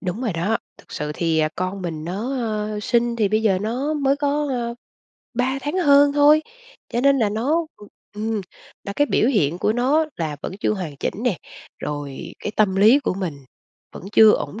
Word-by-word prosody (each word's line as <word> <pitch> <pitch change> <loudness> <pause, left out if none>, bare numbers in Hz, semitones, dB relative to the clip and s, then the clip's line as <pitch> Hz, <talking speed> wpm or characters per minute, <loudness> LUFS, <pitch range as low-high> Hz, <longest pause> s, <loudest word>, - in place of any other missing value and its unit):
Đúng 190 +3 -4
rồi 235 -6 -1
đó, 175 +7 0 0.2
thực - - -17
sự 150 0 -3
thì, 165 -1 0
à, 155 0 +2
con 185 +1 -3
mình 160 -3 -4
nó, 210 +10 -3
ờ, 215 -2 -2
sinh 235 +1 +1
thì 215 -3 +2
bây 215 +2 +1
giờ 195 -4 +3
nó 250 +8 -2
mới 280 -2 +1
có, 290 +1 0
à, 235 -2 -2 0.6
3 255 +3 0
tháng 295 +5 -2
hơn 285 -4 +5
thôi, 295 +2 +5 0.5
cho 240 - -1
nên 275 +1 +4
là 220 - +2
nó 290 +10 0 0.5
ừm, 215 +1 -2 0.4
và 200 - -4
cái 290 - +3
biểu 235 - +2
hiện 175 - +1
của 210 - +1
nó 275 +7 +2
là 155 -3 -3
vẫn - - -4
chưa - - +1
hoàn 180 -8 -5
chỉnh - - -3
nè, 215 -8 +1 0.4
rồi 145 -2 -6
cái 210 - -5
tâm 200 -3 +2
lý 220 +8 +6
của 280 - -1
mình 180 -6 -4 0.6
vẫn - - -10
chưa 220 -1 +8
ổn 220 - -3
220 Hz, 200 wpm, -22 LUFS, 185-270 Hz, 0.6 s, chưa